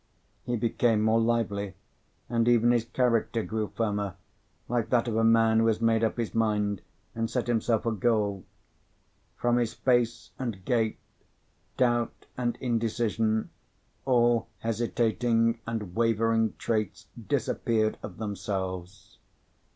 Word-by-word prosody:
He 120 - -1
became 115 -1 +1
more 110 +1 +3
lively, 105 -4 0 0.5
and 115 0 +1
even 120 0 +5
his 120 -2 +2
character 115 -2 +1
grew 110 -1 -2
firmer, 105 -3 -1 0.5
like 120 -2 -1
that 120 -1 +2
of 115 - -1
a 115 - +2
man 115 0 +5
who 115 - +3
has 110 -1 +2
made 115 0 +2
up 110 - 0
his 115 -2 -2
mind, 105 -3 0 0.3
and 115 0 -2
set 125 - -1
himself 115 -1 +1
a 115 - +1
goal. 105 -3 0 0.9
From 120 0 +2
his 120 -1 0
face 120 -2 +1
and 115 -8 -4
gait, 115 -3 +1 0.8
doubt 120 -2 +1
and 120 -1 -1
indecision, 115 -2 0 0.5
all 120 -3 +3
hesitating 115 0 +1
and 110 -6 -4
wavering 115 -1 +2
traits 110 -4 -2 0.2
disappeared 110 -2 0
of - - -8
themselves. 95 -3 -5
115 Hz, 130 wpm, -28 LUFS, 110-120 Hz, 0.9 s, even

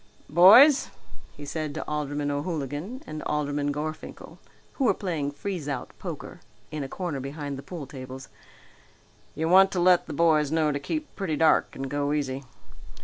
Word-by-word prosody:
"Boys," 215 - +7 0.5
he 145 - -8
said 155 0 -4
to - - -5
Alderman 145 -1 -2
O'Hooligan 150 - -4
and 155 0 -6
Alderman 145 -1 -1
Gorfinkel, 155 +2 -6 0.3
who 270 - -1
were - - +4
playing 165 -8 -2
freeze 155 +1 -5
out 135 -3 -4
poker - - -7 0.3
in 150 -2 -4
a 135 - -6
corner 170 -5 -4
behind 140 +1 -5
the 135 - -7
pool 165 -1 -7
tables, 130 -1 -9 1.1
"you 160 +1 -1
want 190 +3 +7
to 180 - 0
let 180 0 +4
the - - -5
boys 155 -2 +3
know 160 -2 +2
to 145 - -2
keep 310 - -5
pretty 190 -6 -2
dark 155 0 +3
and 135 - -4
go 145 +1 -1
easy. 135 -2 -2
150 Hz, 165 wpm, -26 LUFS, 145-175 Hz, 1.1 s, Boys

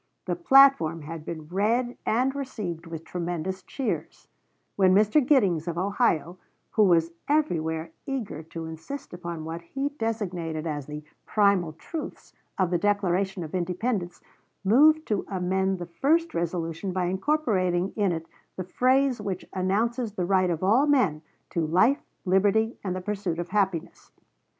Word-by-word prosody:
The 180 - -1
platform 170 - +5
had 160 +1 -7
been 160 -2 -7
read 230 +7 0
and 255 +4 +2
received 210 - -5
with 165 -1 -7
tremendous 175 +2 -4
cheers, 265 +6 -4 0.5
when 190 -1 +4
Mr. 215 +8 +4
Giddings, 195 - +3
of 170 -1 -3
Ohio, 185 - 0 0.3
who 215 - +4
was 170 -2 +3 0.2
everywhere 165 - 0 0.2
eager 240 - -4
to 165 +1 -7
insist 160 - -8
upon 170 -2 -6
what 165 +1 -5
he 270 +11 -3
designated 185 - -3
as 145 -4 -3
the 150 0 -7 0.2
"primal 200 -6 +2
truths" 300 - -8 0.2
of 185 -2 +1
the 175 - +2
Declaration 195 -1 0
of 155 - -8
Independence, 180 +1 -2 0.4
moved 305 +10 +5
to 210 -3 -1
amend 190 0 0
the 175 - -5
first 300 - +1
resolution 170 +2 -2
by 185 -1 0
incorporating 190 - 0
in 205 -4 +2
it 165 -1 -3 0.3
the 185 - -4
phrase 255 +5 +2
which 195 -3 -4
announces 215 +5 0
the 185 -4 -2
right 185 0 +3
of 170 0 -2
all 235 +10 +4
men 205 - +2 0.3
to 170 - 0
"life, 200 - +3 0.2
liberty, 205 +5 +2
and 185 -2 -2
the 185 - -4
pursuit 195 -3 -3
of 175 0 -4
happiness." 190 -6 -1
185 Hz, 150 wpm, -26 LUFS, 170-225 Hz, 0.5 s, platform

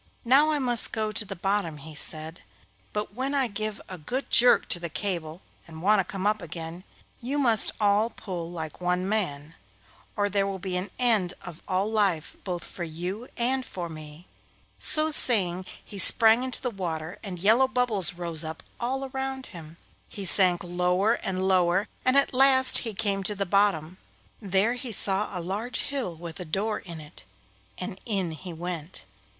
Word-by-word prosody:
'Now 275 +6 +5
I 305 - 0
must 245 -4 +2
go 215 -1 -2
to 215 0 -1
the 195 - -7
bottom,' 195 -4 -2
he 155 +2 -11
said, 155 +2 -5 0.5
'but 210 -1 -5
when 265 +5 -3
I 275 -2 +1
give 215 0 -5
a 185 -2 -9
good 255 - -5
jerk 245 +1 +5
to 175 - +6
the 170 0 -6
cable 170 -2 -4 0.3
and 160 0 -11
want 210 +1 +4
to - - +2
come 195 +1 -6
up 210 +1 +1
again, 165 +2 -8 0.4
you 265 +4 -3
must 235 -7 +4
all 210 +2 +2
pull 180 -7 -7
like 160 -1 -8
one 180 +1 -1
man, 165 -8 -3 0.6
or 205 -1 0
there 200 -1 0
will 195 -1 -4
be 185 -1 -5
an 180 +2 -3
end 220 -8 +1
of 175 -2 -10
all 190 +2 0
life 195 -8 -1
both 180 -3 -5
for 175 - -6
you 180 +8 -6
and 255 +2 0
for 175 -7 -7
me.' 155 +1 -11 0.5
So 310 0 +3
saying 185 - +4 0.2
he 200 - -8
sprang 225 +5 +8
into 260 +1 -3
the 250 - -2
water, 170 -3 -6
and 190 -4 -7
yellow 220 +9 +3
bubbles 245 -8 +2
rose 170 -2 -1
up 160 0 -8 0.2
all 265 +3 -3
around 265 0 -5
him. 165 -1 -12 0.3
He 200 - -6
sank 180 -1 +5
lower 180 +4 0
and 190 -4 -3
lower, 185 +1 +2 0.2
and 255 +2 +3
at 280 - +2
last 260 0 +7
he 225 -4 -6
came 200 -2 -1
to 205 +2 -3
the 200 0 -2
bottom. 185 -3 0 0.4
There 200 +3 +1
he 250 -1 -7
saw 200 0 +1
a 180 -3 -6
large 220 +6 -3
hill 265 -12 -4
with 165 +1 -9
a - - -3
door 200 +6 -2
in 170 -4 -10
it, 150 -1 -12 0.5
and 190 +1 -7
in 195 -6 -2
he 175 +3 -9
went. 170 0 -7
195 Hz, 185 wpm, -26 LUFS, 175-225 Hz, 0.6 s, sprang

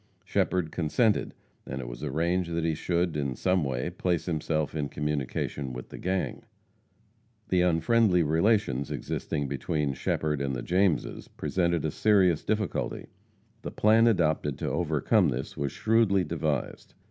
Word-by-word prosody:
Shepherd 90 -4 0
consented, 100 +7 +1 0.3
and 65 - -6
it 60 - -6
was - - -8
arranged 85 +5 0
that 85 - -1
he 80 -1 +1
should, 85 +1 -1
in 70 -3 -2
some 90 -2 +1
way, 65 +4 -2
place 90 -2 -1
himself 80 -2 -1
in 75 -3 -2
communication 70 -2 -3
with 60 0 -8
the - - -9
gang. 95 0 -2 1.1
The 90 -1 +3
unfriendly 90 +2 +3
relations 80 - +1
existing 70 -1 -3
between 70 +1 -1
Shepherd 75 +2 -1
and 70 -1 -1
the - - -4
Jameses 90 -2 0
presented 85 -3 -1
a 80 - 0
serious 95 -6 +3
difficulty. 105 -3 -2 0.5
The - - -5
plan 110 +2 +4
adopted 80 - +1
to - - -3
overcome 85 - +2
this 65 +1 -4
was 70 -1 -2
shrewdly 110 -4 +2
devised. 75 -4 -3
80 Hz, 145 wpm, -28 LUFS, 70-90 Hz, 1.1 s, plan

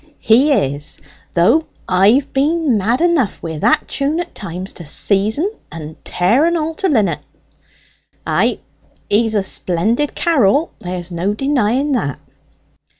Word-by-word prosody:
"He 255 +7 +4
is; 145 - -1 0.4
though 230 - +3 0.2
I've 205 +9 +3
been 295 -1 +1
mad 225 +7 +1
enough 335 - +2
wi' 160 -2 -5
that 310 - +2
tune 290 +4 -1
at 350 - -5
times 185 -1 -6
to 175 - -10
seize 200 - +1
en 370 +8 0 0.2
and 160 -1 -8
tear 225 - +2
en 340 0 +1
all 320 0 -2
to 380 +4 -1
linnit. 220 -9 +1 1.1
Ay, - - +1 0.5
he's 220 +1 +2
a 205 - +2
splendid 210 - 0
carrel 290 - +2
there's 180 0 -6
no 180 +5 -1
denying 270 +1 0
that." 180 - -1
225 Hz, 140 wpm, -17 LUFS, 185-295 Hz, 1.1 s, He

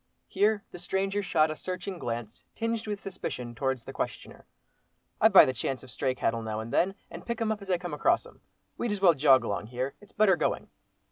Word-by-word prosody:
Here 205 +1 +2
the 180 - -9
stranger 195 +3 -1
shot 160 -5 +2
a - - -4
searching 185 +2 -5
glance, 115 -4 -5
tinged 230 -1 -2
with 205 -1 -3
suspicion, 125 -12 -5
towards 130 -1 -1
the - - -9
questioner. - - -5 0.7
"I - - +8
buy - - +9
the 130 - -1
chance 130 +2 -3
of 130 - -12
stray 130 -2 -1
cattle 115 -2 0
now 110 -1 -3
and 110 +1 -6
then, 195 +2 +2 0.2
and - - -8
pick 235 -1 -3
'em 225 -1 0
up 215 -1 -3
as 200 - -10
I 180 - +3
come 175 -2 -6
across 335 - +2
'em. - - -16 0.4
We'd 240 - -1
as 205 - -1
well 185 -3 +6
jog 135 -3 +5
along 100 +1 -3
here, 125 +3 -3
it's 205 - -17
better 210 -4 +4
going." - - -2
175 Hz, 220 wpm, -28 LUFS, 130-200 Hz, 0.7 s, buy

